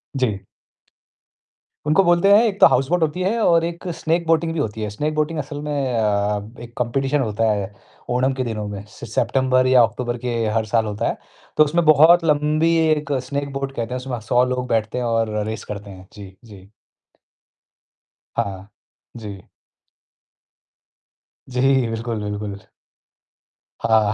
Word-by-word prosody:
जी। 110 -7 -1 1.4
उनको 160 +6 +4
बोलते 175 +2 +4
हैं 215 +3 +7
एक 200 -3 -2
तो - - +9
हाउस 130 +1 +1
बोट 180 0 +1
होती 160 +3 -1
है 205 +6 0
और 170 -3 +4
एक 170 +2 -6
स्नैक 165 +1 -1
बोटिंग 165 0 +2
भी 165 - -3
होती 110 -5 -3
है, 105 - -2
स्नैक 150 +9 -2
बोटिंग 155 +1 -1
असल 145 +1 -5
में 150 0 -4 0.2
अ, 105 +1 -1
एक 120 0 -11
कॉम्पिटिशन 135 +4 0
होता 110 -1 0
है, 100 -1 -3 0.4
ओणम 125 +2 +1
के 130 0 -2
दिनों 110 -3 -4
में 100 -1 -6
सि - - -10
सेप्टेंम्बर 130 +3 +1
या 130 -1 +6
अक्टूबर 120 +2 -2
के 120 0 -3 0.2
हर 110 - 0
साल 110 +1 +1
होता 105 -1 -2
है, - - -2 0.4
तो 155 - +8
उसमें 165 +3 +1
बहुत 160 +3 +6
लंबी 155 +2 +2
एक 150 -2 0
स्नैक 140 +2 -4
बोट 135 0 -3
कहते 115 +1 -3
हैं - - -2
उसमें 125 -2 -4
100 125 0 +4
लोग 125 0 -2
बैठते 115 0 -1
हैं 125 - -1
और 115 -2 0
रेस 110 0 -5
करते 100 0 -8
हैं। 95 0 -13
जी, 100 -2 -11
जी। 100 -3 -14 1.7
हाँ। 95 -1 -3 0.5
जी। 100 -4 -8 2.1
जी। 125 0 -2 0.3
बिल्कुल, 115 -1 -3
बिल्कुल। 105 -1 -4 1.2
हाँ। 110 -2 +3
125 Hz, 160 wpm, -21 LUFS, 105-150 Hz, 2.1 s, तो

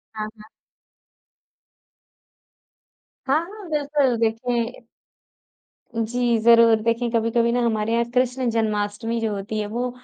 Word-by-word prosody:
हाँ, 215 0 -3
हाँ। 215 - -14 2.8
हाँ, 275 +3 +3
हाँ, 400 0 -11
बिल्कुल 290 -4 +1
देखिए 230 +1 -1 1.2
जी, 235 +1 0
ज़रूर। 230 0 +6
देखिए 230 +1 0
कभी-कभी 230 0 +1
ना 245 +1 +1
हमारे 220 -1 0
यहाँ 235 0 +2
कृष्ण 250 0 +1
जन्माष्टमी 220 +1 -1
जो 225 -1 -1
होती 205 +2 -4
है 210 - -2
वो 240 +4 -2
230 Hz, 115 wpm, -23 LUFS, 220-245 Hz, 2.8 s, ज़रूर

